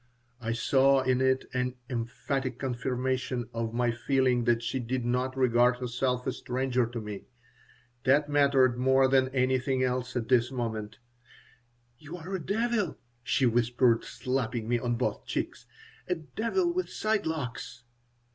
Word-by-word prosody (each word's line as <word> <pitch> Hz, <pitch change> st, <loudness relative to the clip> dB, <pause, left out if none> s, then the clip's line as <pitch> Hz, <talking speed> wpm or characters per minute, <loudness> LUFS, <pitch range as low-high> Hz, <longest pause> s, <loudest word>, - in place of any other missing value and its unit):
I 115 Hz, 0 st, -1 dB
saw 135 Hz, +3 st, +4 dB
in 130 Hz, 0 st, +2 dB
it 130 Hz, 0 st, +2 dB
an 125 Hz, 0 st, -1 dB
emphatic 125 Hz, +1 st, -3 dB
confirmation 130 Hz, -1 st, -2 dB
of 115 Hz, -1 st, -2 dB
my 120 Hz, 0 st, +2 dB
feeling 125 Hz, 0 st, +1 dB
that 120 Hz, -1 st, +2 dB
she 120 Hz, +3 st, -2 dB
did 125 Hz, 0 st, -2 dB
not 125 Hz, +2 st, -1 dB
regard 125 Hz, -1 st, +4 dB
herself 125 Hz, 0 st, -1 dB
a 130 Hz, -, 0 dB
stranger 125 Hz, -1 st, -1 dB
to 120 Hz, 0 st, -5 dB
me. 105 Hz, -2 st, -7 dB, 0.8 s
That 145 Hz, +3 st, +4 dB
mattered 140 Hz, -4 st, +3 dB
more 130 Hz, +1 st, +4 dB
than 130 Hz, -1 st, +3 dB
anything 130 Hz, 0 st, +1 dB
else 125 Hz, 0 st, -1 dB
at 115 Hz, -2 st, -2 dB
this 125 Hz, -1 st, +3 dB
moment 110 Hz, -4 st, -4 dB, 1.0 s
"You're 170 Hz, +4 st, -8 dB
a 170 Hz, -, -8 dB
devil," 220 Hz, -2 st, 0 dB, 0.2 s
she 130 Hz, +2 st, +1 dB
whispered, 120 Hz, 0 st, +3 dB
slapping 125 Hz, -3 st, -2 dB
me 120 Hz, 0 st, +1 dB
on 120 Hz, 0 st, -1 dB
both 125 Hz, +2 st, -2 dB
cheeks, -, -, -4 dB, 0.4 s
"a 180 Hz, -, +1 dB
devil 230 Hz, -, -1 dB
with 370 Hz, +1 st, -2 dB
side 215 Hz, -4 st, 0 dB
locks." 125 Hz, -6 st, -5 dB
130 Hz, 145 wpm, -29 LUFS, 120-135 Hz, 1.0 s, saw